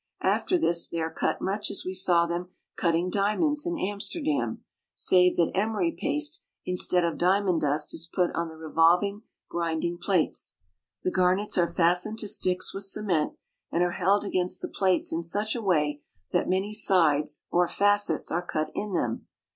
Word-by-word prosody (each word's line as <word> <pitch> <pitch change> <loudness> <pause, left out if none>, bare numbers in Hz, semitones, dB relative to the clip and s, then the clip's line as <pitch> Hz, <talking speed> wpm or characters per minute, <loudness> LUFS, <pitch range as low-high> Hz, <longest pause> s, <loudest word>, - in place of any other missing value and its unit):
After 365 - +1
this, 170 - +1
they 170 - -3
are 160 0 -3
cut - - -1
much 200 +2 -1
as - - -2
we 185 - -3
saw 180 -2 +3
them 175 +1 -4 0.3
cutting 170 +1 0
diamonds 290 - +1
in 345 -1 -2
Amster 205 - -2
dam, 300 -2 -2 0.3
save 180 -1 +4
that 170 - +2
emery 220 - 0
paste 295 +4 -1 0.2
instead 180 -1 +2
of 170 - -3
diamond 185 -1 +2
dust 150 +1 0
is 165 - -2
put 180 -1 +1
on 170 0 -2
the 160 - -11
revolving 170 +6 +2 0.3
grinding 170 0 -2
plates. 185 -6 +1 0.5
The 185 - 0
garnets 185 +3 +1
are 170 -1 +1
fastened 180 +5 +2
to 215 - -1
sticks 185 -1 +1
with 195 0 -3
cement, 195 -6 0 0.4
and 170 - +1
are 175 - 0
held 195 +3 +1
against 185 -1 -1
the - - -3
plates 185 -4 +1
in 165 - -1
such 205 +6 -1
a 235 - -3
way 150 -7 0 0.3
that - - 0
many 190 +3 0
sides 155 -8 +2
or 175 0 +3
facets 205 -5 +1
are 170 - 0
cut 155 -3 -3
in 210 -1 -4
them. 120 -9 -2
180 Hz, 175 wpm, -27 LUFS, 170-205 Hz, 0.5 s, save